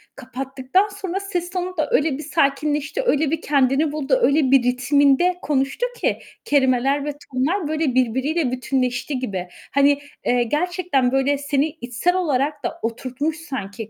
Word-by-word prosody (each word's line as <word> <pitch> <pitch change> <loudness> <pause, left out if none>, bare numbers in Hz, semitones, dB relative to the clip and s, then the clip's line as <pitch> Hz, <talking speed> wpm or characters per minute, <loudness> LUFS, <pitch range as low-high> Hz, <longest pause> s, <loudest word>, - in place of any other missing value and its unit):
kapattıktan 265 +7 -1
sonra 395 -2 -4
ses 360 -3 -3
tonu 365 0 -4
da 305 -2 0
öyle 295 -3 +2
bir 305 - -7
sakinleşti, 295 - 0
öyle 305 - +2
bir 325 0 -1
kendini 280 +1 +2
buldu, 305 - 0
öyle 280 - +3
bir 270 -2 +6
ritminde 280 +7 +3
konuştu 275 - 0
ki - - 0 0.3
kelimeler 275 - +2
ve 295 - -2 0.2
tonlar 300 +8 0
böyle 305 -4 -1
birbiriyle 260 +4 +1
bütünleşti 255 +1 -1
gibi. 190 -8 -4 0.2
Hani, 280 +1 +4 0.3
eee, 245 0 +3
gerçekten 305 -1 0
böyle 270 +2 +2
seni 285 +1 0
içsel 245 +9 0
olarak 295 -4 0
da - - -4
oturtmuş 255 +7 -3
sanki, 230 - -6
280 Hz, 145 wpm, -21 LUFS, 260-320 Hz, 0.3 s, bir